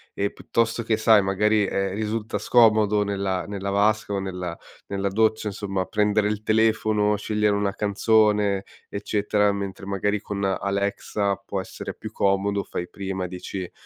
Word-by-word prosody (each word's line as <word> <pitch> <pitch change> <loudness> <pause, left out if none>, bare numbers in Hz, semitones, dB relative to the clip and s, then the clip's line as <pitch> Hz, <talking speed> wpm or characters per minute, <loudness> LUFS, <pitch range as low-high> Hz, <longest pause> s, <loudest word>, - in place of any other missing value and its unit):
e 100 0 -1
piuttosto 115 0 -1
che, 110 -1 0
sai, 110 -1 +5
magari, 105 +2 +2
ehm, 95 -1 -1
risulta 110 0 -2
scomodo 105 -3 +4
nella 100 -2 -2
nella 100 -1 -4
vasca 105 +1 +1
o 100 - 0
nella 90 -3 -5 0.3
nella 100 0 -1
doccia 110 +2 +1
insomma 100 -2 -3
prendere 105 0 +1
il 105 0 -2
telefono, 110 -1 +2
scegliere 105 0 +1
una 100 -1 -1
canzone, 105 -1 +2 0.3
eccetera, 105 0 +1
mentre 100 -1 -5
magari 100 +1 -1
con 100 -1 -4
Alexa 100 +1 -1
può 95 -1 -3
essere - - -7
più - - -9
comodo, 100 +1 +1
fai 90 0 -5
prima, 95 -2 -4
dici, 90 0 -6
100 Hz, 145 wpm, -24 LUFS, 100-105 Hz, 0.3 s, sai